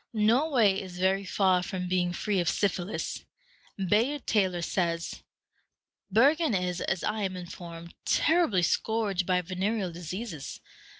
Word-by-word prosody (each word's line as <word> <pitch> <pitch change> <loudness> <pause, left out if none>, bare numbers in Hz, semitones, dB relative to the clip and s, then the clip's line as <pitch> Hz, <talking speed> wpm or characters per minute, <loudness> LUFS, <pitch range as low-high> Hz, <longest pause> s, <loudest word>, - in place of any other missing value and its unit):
Norway 225 -2 +3
is 185 -2 -9
very 190 +2 +2
far 185 -1 +2
from 180 0 -4
being 180 -1 +1
free 195 +2 -1
of 175 - +1
syphilis. 195 -1 -2 0.5
Bayard 220 +9 +1
Taylor 185 -5 +1
says, 170 -2 -1 0.9
"Bergen 280 - +4
is, 180 -1 -1
as 190 - -1
I 215 0 -1
am 190 -2 -2
informed, 170 -1 -9
terribly 315 - +3
scourged 205 -2 0
by 180 -1 +2
venereal 190 +2 -2
diseases. 175 - -6
190 Hz, 125 wpm, -28 LUFS, 180-215 Hz, 0.9 s, Bergen